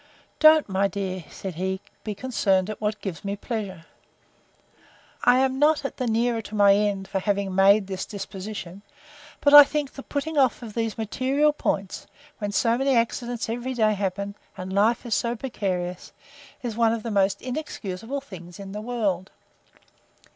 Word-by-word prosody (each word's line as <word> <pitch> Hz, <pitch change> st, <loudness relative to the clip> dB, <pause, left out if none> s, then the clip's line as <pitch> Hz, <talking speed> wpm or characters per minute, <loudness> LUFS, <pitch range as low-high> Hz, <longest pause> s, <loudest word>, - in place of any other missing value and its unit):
Don't, 310 Hz, -1 st, +7 dB
my 195 Hz, 0 st, +1 dB
dear, 185 Hz, -3 st, -4 dB
said 190 Hz, -2 st, -6 dB
he, 190 Hz, +3 st, -2 dB, 0.2 s
be 210 Hz, -2 st, -4 dB
concerned 195 Hz, -5 st, +1 dB
at 215 Hz, -, -9 dB
what 210 Hz, 0 st, -2 dB
gives 190 Hz, -5 st, -5 dB
me 200 Hz, 0 st, -2 dB
pleasure. 200 Hz, -6 st, -5 dB, 1.4 s
I 245 Hz, +1 st, +6 dB
am 265 Hz, 0 st, +1 dB
not 300 Hz, 0 st, +4 dB
the 255 Hz, -, -2 dB
nearer 230 Hz, +1 st, +1 dB
my 200 Hz, -1 st, +6 dB
end, 200 Hz, -1 st, 0 dB
for 195 Hz, -, -2 dB
having 200 Hz, -1 st, -1 dB
made 195 Hz, +2 st, +5 dB
this 190 Hz, -1 st, -5 dB
disposition; 195 Hz, -2 st, -7 dB, 0.6 s
but 285 Hz, -, +4 dB
I 290 Hz, 0 st, +13 dB
think 285 Hz, -1 st, -3 dB
the 275 Hz, -, -8 dB
putting 290 Hz, +2 st, -2 dB
off 260 Hz, -3 st, +3 dB
these 225 Hz, -1 st, -3 dB
material 265 Hz, +7 st, +1 dB
points, 195 Hz, -9 st, -3 dB, 0.3 s
when 205 Hz, -2 st, -2 dB
so 230 Hz, +4 st, +2 dB
many 270 Hz, -1 st, +2 dB
accidents 235 Hz, 0 st, -1 dB
every 245 Hz, +3 st, -3 dB
day 215 Hz, -2 st, +3 dB
happen, 200 Hz, 0 st, -3 dB, 0.2 s
and 185 Hz, +1 st, -6 dB
life 220 Hz, +5 st, +2 dB
is 235 Hz, -, -2 dB
so 235 Hz, +2 st, 0 dB
precarious, 185 Hz, -7 st, -4 dB, 0.5 s
is 235 Hz, -3 st, -3 dB
one 230 Hz, -1 st, +3 dB
of 230 Hz, -2 st, -4 dB
the 230 Hz, -, -3 dB
most 195 Hz, -1 st, +2 dB
inexcusable 250 Hz, -3 st, -5 dB
things 175 Hz, -8 st, -11 dB
in 195 Hz, -1 st, -8 dB
the 210 Hz, +1 st, -5 dB
world. 210 Hz, -6 st, -2 dB
215 Hz, 160 wpm, -25 LUFS, 195-245 Hz, 1.4 s, I